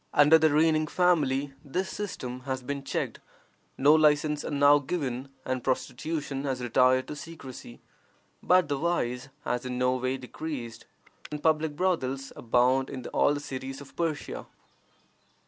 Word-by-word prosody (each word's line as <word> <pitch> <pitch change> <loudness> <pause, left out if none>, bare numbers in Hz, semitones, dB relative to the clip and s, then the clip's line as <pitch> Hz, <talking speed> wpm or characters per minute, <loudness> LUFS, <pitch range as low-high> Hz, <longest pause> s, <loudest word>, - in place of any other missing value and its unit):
Under 150 +2 +7
the 160 0 +4
reigning 155 +1 +3
family 145 -6 +2
this 180 +6 -2
system 130 -11 -5
has 130 -1 -2
been 140 +2 -4
checked; 135 - -3 0.6
no 145 +3 +6
licenses 150 -1 +3
are - - -4
now 145 0 +5
given, 135 -3 -3 0.2
and 130 -1 -2
prostitution 135 +2 -2
has 135 -3 -2
retired 130 +2 +3
to - - -6
secrecy. 140 -6 -10 0.6
But 180 -3 +4
the 145 -1 -1
vice 135 -6 -1 0.2
has 125 0 -1
in 125 -1 -4
no 125 0 +2
way 130 +1 -1
decreased, 125 -3 -7 0.4
and 150 0 -6
public 155 -1 +2
brothels 135 -7 -1
abound 125 +3 +2
in 130 -3 -7
all 145 - +3
the - - -3
cities 135 -1 -6
of 140 -1 -13
Persia. 165 -3 -3
140 Hz, 145 wpm, -28 LUFS, 130-155 Hz, 0.6 s, Under